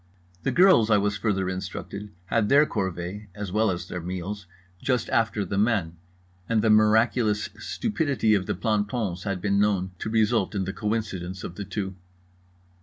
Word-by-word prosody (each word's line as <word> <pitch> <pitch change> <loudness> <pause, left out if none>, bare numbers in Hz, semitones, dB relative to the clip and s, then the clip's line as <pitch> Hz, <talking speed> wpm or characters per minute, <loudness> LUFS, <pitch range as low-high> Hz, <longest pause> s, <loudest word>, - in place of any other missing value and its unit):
The - - 0
girls, 180 - +5
I 105 - +5
was 105 0 +1
further 100 -3 0
instructed, 95 +2 -5 0.2
had 105 +2 +1
their 145 +2 +6
corvée 95 - -4
(as 105 -3 -5
well 110 +2 +2
as 85 -2 -3
their 90 - -5
meals) 95 +3 -5 0.3
just 125 -3 0
after 110 -3 +1
the 100 - -1
men; 100 -7 +1 0.5
and 110 -2 +2
the 110 - +4
miraculous 110 0 +3
stupidity 145 - 0
of 95 -3 +1
the - - -1
plantons 105 -4 -1
had 100 -3 -1
been 100 0 +1
known 100 -3 +1
to - - -3
result 110 -2 +1
in 95 - 0
the 95 +1 -4
coincidence 100 -5 -3
of 85 - -6
the 100 +2 -6
two. 95 -2 -4
105 Hz, 170 wpm, -26 LUFS, 95-110 Hz, 0.5 s, their